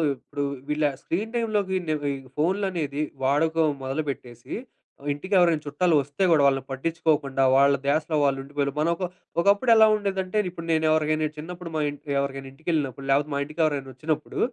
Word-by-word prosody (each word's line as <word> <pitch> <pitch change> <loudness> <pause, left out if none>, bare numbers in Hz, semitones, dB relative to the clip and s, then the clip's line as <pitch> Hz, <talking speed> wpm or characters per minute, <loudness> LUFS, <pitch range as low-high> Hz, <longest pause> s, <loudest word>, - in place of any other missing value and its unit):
ఇప్పుడు 145 +3 -5 0.3
వీళ్ళ 150 0 +1 0.2
స్క్రీన్ 210 +7 -2
టైమ్‌లోకి 210 -5 0
నేను 150 -2 -1
ఈ - - -6 0.2
ఫోనులనేది 170 -4 0 0.2
వాడకం 160 +3 +2
మొదలుపెట్టేసి, 130 -4 -5 0.6
ఇంటిికెవరైనా 175 0 +2
చుట్టాలు 155 +3 +2
వస్తే 145 +8 -3
గూడా 150 -3 +5
వాళ్ళని 135 -1 +3
పట్టిచ్చుకోకుండా, 145 -2 0
వాళ్ళ 140 +1 +5
ధ్యాసలో 155 +2 +1
వాళ్ళు 135 -1 +2
ఉండిపోయేళ, 140 0 -2
మన 155 - +2
ఒక 185 - -6 0.4
ఒకప్పుడు 200 +6 +3
ఎలా 220 0 +7
ఉండేదంటే, 195 -1 -2
ఇప్పుడు 170 -2 -8
నేనెవరికైనా 155 -1 +2
చిన్నప్పుడు 175 +2 -7
మా 155 - +1
ఇంట్ 145 - -9 0.2
ఎవరికైనా 135 -1 -3
ఇంటిికెళ్ళినప్పుడు, 140 -3 -2
లాకపోతే 145 +2 +2
మా 140 - 0
ఇంటిికెవరైనా 150 -3 -1
వచ్చినప్పుడు, 150 +3 -3
155 Hz, 145 wpm, -25 LUFS, 140-175 Hz, 0.6 s, ఎలా